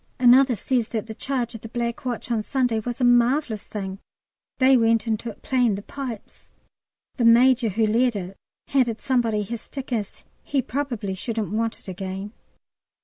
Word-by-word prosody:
Another 255 +1 +6
says 235 +2 0
that 220 -3 -3
the 220 - -7
charge 245 0 -2
of 225 - -8
the 225 - -9
Black 235 +1 -3
Watch 245 0 -3
on 225 -2 +1
Sunday 245 -1 0
was 240 +3 -5
a - - 0
marvellous 245 -1 +3
thing. 195 -2 -5 0.6
They 260 0 +5
went 230 -2 +3
into 225 +1 -2
it 215 - -12
playing 245 -5 +2
the 200 - -7
pipes! 250 -5 -8 0.7
The 245 - 0
Major 240 0 +5
who 220 +3 +1
led 235 +2 +2
it 190 -1 -5 0.3
handed 245 -5 +1
somebody 230 -5 +1
his 230 +2 -5
stick, 270 -2 -7
as 210 -4 -4 0.2
he 280 - -1
"probably 245 -7 -3
shouldn't 215 0 -3
want 225 +1 -1
it - - -15
again." 190 +2 -5
235 Hz, 175 wpm, -24 LUFS, 215-250 Hz, 0.7 s, Another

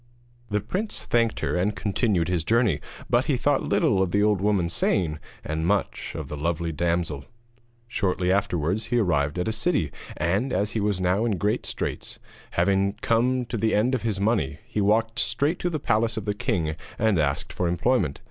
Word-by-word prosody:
The 105 0 0
prince 190 - -3
thanked 115 -1 +1
her - - 0
and 100 +4 +1
continued 100 -2 0
his 90 -3 0
journey, 110 - +2 0.3
but - - +2
he - - +1
thought - - +1
little 95 - +3
of 95 - +1
the 100 +3 +2
old 105 -3 +2
woman's 95 -5 +1
saying, 80 -7 +1 0.2
and 80 +2 -2
much 100 0 -1
of - - -5
the 75 - -5
lovely 85 +2 -1
damsel. 85 -3 -1 0.6
Shortly 90 -5 0
afterwards 95 +1 0
he 120 +1 0
arrived 75 -8 +1
at 90 - -1
a - - +1
city; 110 - 0 0.3
and, 95 - 0
as 105 +1 0
he 110 - -1
was 100 -2 0
now 95 +4 +2
in 110 -5 0
great 105 +6 0
straits, - - -3 0.4
having 95 +2 +2
come 125 +2 +2
to 120 0 -4
the 110 +1 +1
end 115 +5 +2
of 130 - 0
his 110 -4 -1
money, 100 - +1
he 105 - -2
walked 110 +3 +2
straight 140 +9 +1
to 175 - 0
the 165 - -2
palace 115 -2 +1
of 110 - -3
the 105 - 0
king 80 -6 -1 0.2
and 110 -5 +2
asked 70 -2 -1
for 90 - -1
employment. 90 - +1
100 Hz, 195 wpm, -25 LUFS, 85-115 Hz, 0.6 s, little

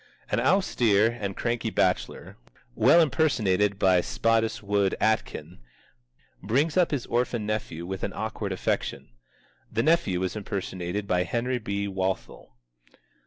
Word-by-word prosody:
An 105 - +2
austere 120 - +3
and 100 -5 -5
cranky 120 -1 -1
bachelor 95 -3 -1 0.4
(well 170 - +5
impersonated 105 - +2
by 95 -2 +4
Spottiswoode 105 -3 0
Aitken) 90 -6 -1 0.8
brings 135 - +1
up 180 -2 +4
his 140 -5 -2
orphan 120 -2 -1
nephew 105 -6 -3
with 95 +1 -5
an - - -1
awkward - - -4
affection. - - -2 0.6
The 115 - 0
nephew 105 - +2
is 95 - -2
impersonated 100 -2 -4
by 90 -2 +1
Henry 120 +8 -1
B. 100 -2 -3
Walthall. 95 -10 -4
105 Hz, 120 wpm, -26 LUFS, 95-120 Hz, 0.8 s, well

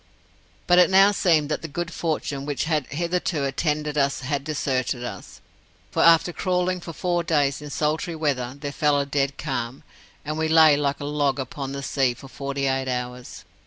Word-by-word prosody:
"But 180 0 +5
it 180 - +6
now 195 +1 +6
seemed 165 -7 +2
that 150 - -2
the 165 - -5
good 170 +3 -4
fortune 150 -4 -2
which 145 -2 -1
had 155 -4 0
hitherto 170 0 -1
attended 150 +1 -1
us 140 0 +1
had 140 +2 -2
deserted 130 -4 -1
us, 105 -6 -8 0.5
for - - 0
after 170 +1 +5
crawling 180 0 0
for 170 - -7
four 175 +1 -1
days 145 -3 +1
in 150 - -8
sultry 160 +4 -1
weather, 140 -5 -2
there 145 0 -4
fell 145 -1 +2
a 140 - 0
dead 140 0 -1
calm, 130 -3 -4 0.4
and 155 +1 -3
we 160 - +1
lay 160 -2 +6
like 145 -1 -1
a - - -4
log 145 -2 0
upon 135 +1 -5
the 140 0 -5
sea 130 -3 +1
for 135 - -12
forty 140 +1 -4
eight 135 0 0
hours. 125 0 -5
145 Hz, 190 wpm, -24 LUFS, 135-160 Hz, 0.5 s, it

